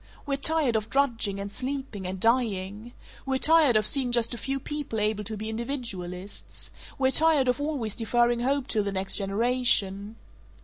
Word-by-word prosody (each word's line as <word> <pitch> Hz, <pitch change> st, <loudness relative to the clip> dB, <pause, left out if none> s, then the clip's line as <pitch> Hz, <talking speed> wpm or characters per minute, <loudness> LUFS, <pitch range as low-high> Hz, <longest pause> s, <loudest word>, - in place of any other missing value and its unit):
We're 280 Hz, -2 st, -1 dB
tired 285 Hz, -3 st, +2 dB
of 215 Hz, 0 st, -2 dB
drudging 230 Hz, -8 st, 0 dB
and 200 Hz, 0 st, -6 dB
sleeping 255 Hz, -5 st, -5 dB
and 190 Hz, +1 st, -5 dB
dying. 220 Hz, -1 st, -1 dB, 0.3 s
We're 265 Hz, -1 st, -1 dB
tired 310 Hz, -3 st, +4 dB
of 215 Hz, -1 st, +2 dB
seeing 255 Hz, +1 st, +4 dB
just 235 Hz, 0 st, 0 dB
a -, -, -5 dB
few 270 Hz, 0 st, -3 dB
people 290 Hz, -5 st, -4 dB
able 210 Hz, 0 st, -1 dB
to 220 Hz, +1 st, -5 dB
be 215 Hz, +1 st, -5 dB
individualists. 220 Hz, -6 st, -6 dB, 0.3 s
We're 265 Hz, -1 st, +2 dB
tired 310 Hz, -3 st, +5 dB
of 250 Hz, +3 st, 0 dB
always 280 Hz, -8 st, -2 dB
deferring 240 Hz, +1 st, +1 dB
hope 270 Hz, +2 st, 0 dB
till 220 Hz, -5 st, +1 dB
the 200 Hz, -, -3 dB
next 190 Hz, 0 st, 0 dB
generation. 205 Hz, -1 st, 0 dB
235 Hz, 170 wpm, -26 LUFS, 205-270 Hz, 0.3 s, tired